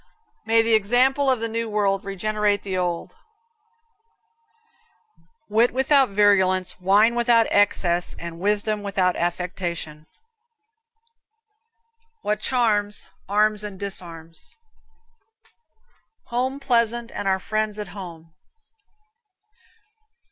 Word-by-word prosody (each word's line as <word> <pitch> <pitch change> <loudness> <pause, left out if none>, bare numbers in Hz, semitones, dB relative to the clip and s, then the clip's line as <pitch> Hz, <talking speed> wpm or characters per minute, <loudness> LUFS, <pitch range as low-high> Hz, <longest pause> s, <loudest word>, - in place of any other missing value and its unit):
May 225 0 +4
the 225 0 +1
example 250 +6 +3
of 255 -3 +1
the 230 - -1
new 230 0 -3
world 200 -2 0
regenerate 205 +1 -1
the 190 -2 -4
old. 175 -2 -3 2.3
Wit 225 +3 +3
without 270 +1 +3
virulence, 190 -3 +2
wine 205 +5 +4
without 235 -1 +3
excess, 180 -4 +1
and 170 0 -8
wisdom 210 +2 0
without 190 -3 0
affectation. 170 -3 -4 2.2
What 210 0 -1
charms, 215 -4 0 0.2
arms 210 +1 +2
and 205 -3 -7
disarms. 165 -5 -7 1.7
Home 255 +3 -2
pleasant, 235 -3 0
and 200 - -4
our 190 0 +2
friends 215 +1 -2
at 210 -3 -6
home. 170 -5 -10
205 Hz, 95 wpm, -23 LUFS, 185-230 Hz, 2.3 s, May